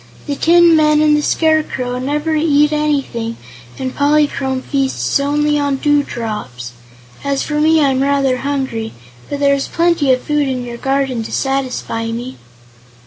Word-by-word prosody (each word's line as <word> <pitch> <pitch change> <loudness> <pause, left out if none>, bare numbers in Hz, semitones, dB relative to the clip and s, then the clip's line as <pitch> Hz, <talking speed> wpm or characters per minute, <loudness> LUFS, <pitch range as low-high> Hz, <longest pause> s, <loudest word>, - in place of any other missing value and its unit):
The 285 - -3
tin 340 +2 +5
men 305 -1 +4
and 305 0 +4
the 300 - +1
Scarecrow 300 -6 0
never 295 +4 -1
eat 300 -1 +3
anything 275 -7 -1 0.4
and 260 -1 -4
Polychrome 285 -3 +1
feasts 275 0 -1
only 295 +1 +1
on 285 -1 0
dewdrops. 225 - -2 0.5
As 280 -1 -1
for 300 0 -2
me, 320 +1 +4
I'm 265 -1 +1
rather 275 -2 +1
hungry, 265 -5 -3 0.4
but 285 - -4
there 280 -1 +3
is 275 -1 -1
plenty 335 -5 +1
of 255 0 +1
food 295 -1 0
in 255 -2 -3
your 240 -1 -7
garden 270 -2 -1
to 225 - -7
satisfy 260 -4 -2
me." 240 +3 -5
280 Hz, 150 wpm, -16 LUFS, 255-300 Hz, 0.5 s, tin